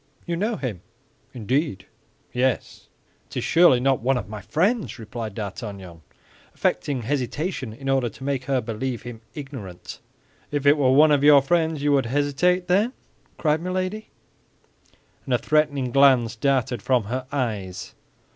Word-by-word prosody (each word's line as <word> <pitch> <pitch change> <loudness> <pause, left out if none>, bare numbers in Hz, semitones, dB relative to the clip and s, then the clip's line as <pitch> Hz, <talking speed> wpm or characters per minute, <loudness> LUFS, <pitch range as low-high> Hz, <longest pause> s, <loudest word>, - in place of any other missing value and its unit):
"You 170 - -2
know 215 +6 -1
him." 115 - -5 0.5
"Indeed." 125 - -2 0.5
"Yes." 125 0 -1 0.4
"It - - -8
is - - -1
surely 165 -7 +5
not 135 0 +2
one 130 +2 +2
of 100 - -5
my 105 0 -7
friends?" 180 - 0
replied 110 -2 -6
D'Artagnan, 100 -5 -7 0.5
affecting 135 -5 -1
hesitation 135 - -2
in 135 +5 -9
order 135 -3 +2
to 135 - -13
make 135 -2 -2
her 135 -3 +1
believe 115 +2 -4
him 120 -2 -8
ignorant. 130 - -8 0.5
"If 145 -1 -2
it 145 +1 +7
were 140 -4 +2
one 150 +3 +6
of 145 -1 +3
your 145 -2 +7
friends 160 -1 +1
you 145 - +2
would 135 -4 +2
hesitate, 145 +7 +1
then?" 205 +8 +2 0.4
cried 155 0 +1
Milady; 185 +4 -3 1.2
and 130 - +1
a - - +3
threatening 145 -1 +1
glance 130 -4 +4
darted 130 -1 0
from 125 +1 +2
her 130 +5 -4
eyes. 100 -10 -3
135 Hz, 150 wpm, -24 LUFS, 115-150 Hz, 1.2 s, it